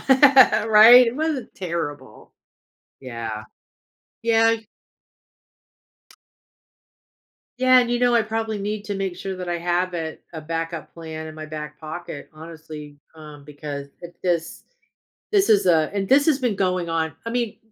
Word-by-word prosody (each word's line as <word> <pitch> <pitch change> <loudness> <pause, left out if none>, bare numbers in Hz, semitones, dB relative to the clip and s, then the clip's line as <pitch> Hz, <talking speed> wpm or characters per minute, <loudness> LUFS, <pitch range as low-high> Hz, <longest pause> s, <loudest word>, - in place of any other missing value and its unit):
right? 250 -4 +7
It 230 - -2
wasn't 300 -5 -3
terrible. 170 -5 -6 0.7
Yeah. 115 -4 -6 0.8
Yeah, 225 0 +3
y 225 -1 -10 2.9
Yeah, 255 0 +5
and, 240 -1 -1
you 240 - +1
know, 245 0 +2
I 230 - +4
probably 220 0 -3
need 205 +1 -4
to 205 - -3
make 195 -2 -3
sure 190 +1 -5
that 180 -1 -6
I 175 0 -2
have 175 +1 -1
it 160 -2 -5
a 160 - -7
backup 165 +1 -5
plan 160 -1 -8
in 155 - -9
my 155 0 -8
back 150 -1 -8
pocket, 155 -1 -8
honestly, 155 -2 -11 0.2
um, 150 -2 -13
because 145 -1 -7
it 175 0 -11
is 170 -2 -2 0.7
this 400 - +3
is 205 -3 +4
a 160 -3 +3
and 195 -1 -2
this 280 +4 +4
has 305 -4 +4
been 245 -6 -1
going 185 -3 -1
on 160 -1 -1
I - - -3
mean, 235 -3 -2
180 Hz, 150 wpm, -22 LUFS, 160-225 Hz, 2.9 s, right